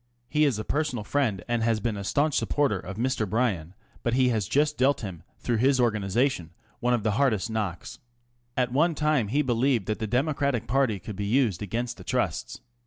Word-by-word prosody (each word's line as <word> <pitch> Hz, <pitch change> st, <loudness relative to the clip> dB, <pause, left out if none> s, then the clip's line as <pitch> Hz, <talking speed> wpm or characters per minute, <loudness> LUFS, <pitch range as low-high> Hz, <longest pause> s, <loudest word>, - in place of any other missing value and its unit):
He 150 Hz, +3 st, +3 dB
is 135 Hz, -7 st, +1 dB
a 110 Hz, -, -3 dB
personal 145 Hz, -4 st, -1 dB
friend 110 Hz, -7 st, 0 dB
and 120 Hz, -1 st, 0 dB
has 115 Hz, -1 st, +2 dB
been 110 Hz, +1 st, -1 dB
a 100 Hz, -, -5 dB
staunch 145 Hz, +9 st, +1 dB
supporter 140 Hz, -10 st, +1 dB
of 95 Hz, +2 st, -8 dB
Mr. 120 Hz, -3 st, 0 dB
Bryan, 95 Hz, -7 st, -1 dB, 0.3 s
but 120 Hz, 0 st, 0 dB
he 130 Hz, -1 st, +4 dB
has 110 Hz, -6 st, 0 dB
just 150 Hz, +1 st, +2 dB
dealt 135 Hz, +3 st, +2 dB
him, 95 Hz, -7 st, -6 dB, 0.2 s
through 120 Hz, -2 st, -1 dB
his 130 Hz, +3 st, +3 dB
organisation, 110 Hz, -, +1 dB, 0.3 s
one 125 Hz, 0 st, +2 dB
of 115 Hz, -, -3 dB
the 110 Hz, -, +2 dB
hardest 115 Hz, -7 st, +2 dB
of -, -, -5 dB
knocks. 100 Hz, -6 st, -4 dB, 0.6 s
At 125 Hz, -1 st, +1 dB
one 165 Hz, +4 st, +3 dB
time 150 Hz, -7 st, +1 dB
he 145 Hz, +8 st, +1 dB
believed 120 Hz, -3 st, +1 dB
that 110 Hz, +1 st, -2 dB
the 110 Hz, -, -2 dB
Democratic 135 Hz, 0 st, 0 dB
party 130 Hz, -4 st, +1 dB
could 100 Hz, +2 st, -8 dB
be 100 Hz, +1 st, -3 dB
used 115 Hz, -5 st, +2 dB
against 120 Hz, +4 st, -3 dB
the -, -, -10 dB
Trusts. -, -, -2 dB
120 Hz, 205 wpm, -27 LUFS, 105-135 Hz, 0.6 s, he